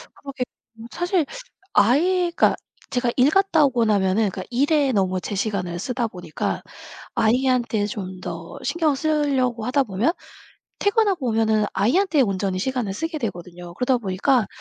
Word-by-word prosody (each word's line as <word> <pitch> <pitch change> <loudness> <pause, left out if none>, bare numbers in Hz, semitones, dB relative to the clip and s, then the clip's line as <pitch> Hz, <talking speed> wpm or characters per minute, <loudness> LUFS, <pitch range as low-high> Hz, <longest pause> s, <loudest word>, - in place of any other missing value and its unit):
그러게 275 -2 -5 0.3
음 225 +1 -10
사실 350 -2 0 0.5
아이 345 - +3
그러니까 - - +4 0.3
제가 245 -2 0
일 255 +3 +5
갔다 340 -4 +4
오고 240 -4 +1
나면은 200 0 +2
그러니까 185 0 -6
일에 280 +2 +2
너무 185 -3 0
제 205 - -4
시간을 185 -4 -2
쓰다 245 +2 -2
보니까 180 -6 -4 0.5
아이한테 235 -2 +2
좀 190 -3 -6
더 - - -7
신경을 315 -5 +1
쓰려고 270 -6 0
하다 270 +3 +2
보면 220 - 0 0.7
퇴근하고 405 - +2
오면은 220 -1 +2
아이한테 290 - +2
온전히 195 -3 -1
시간을 245 -2 -2
쓰게 325 - -3
되거든요. 175 -6 -6
그러다 250 +2 +1
보니까 215 +3 +1
240 Hz, 345 characters per minute, -23 LUFS, 200-285 Hz, 0.7 s, 일